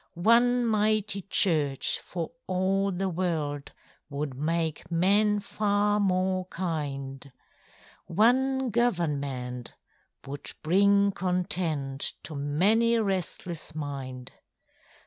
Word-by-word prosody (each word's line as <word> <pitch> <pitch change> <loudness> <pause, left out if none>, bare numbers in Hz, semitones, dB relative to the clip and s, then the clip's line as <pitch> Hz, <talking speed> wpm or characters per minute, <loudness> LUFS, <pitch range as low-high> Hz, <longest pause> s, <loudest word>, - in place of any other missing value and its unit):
One 240 +6 +4
mighty 215 -2 +1
church 155 -8 +1
for 170 +3 -5 0.2
all 190 +2 +1
the 190 +1 -2
world 160 -5 -2 0.4
Would 145 -1 -4
make 160 +3 -2
men 205 +5 +3
far 205 0 +1
more 185 -1 +1
kind; 140 -6 -4 0.8
One 260 +6 +2
government 140 - -1 0.5
would 140 +1 -5
bring 200 +4 +4
content 175 -7 0
To 155 - -7
many 190 +12 +2
a 225 - +2
restless 180 -4 -3
mind. 135 -4 -6
180 Hz, 90 wpm, -27 LUFS, 145-205 Hz, 0.8 s, One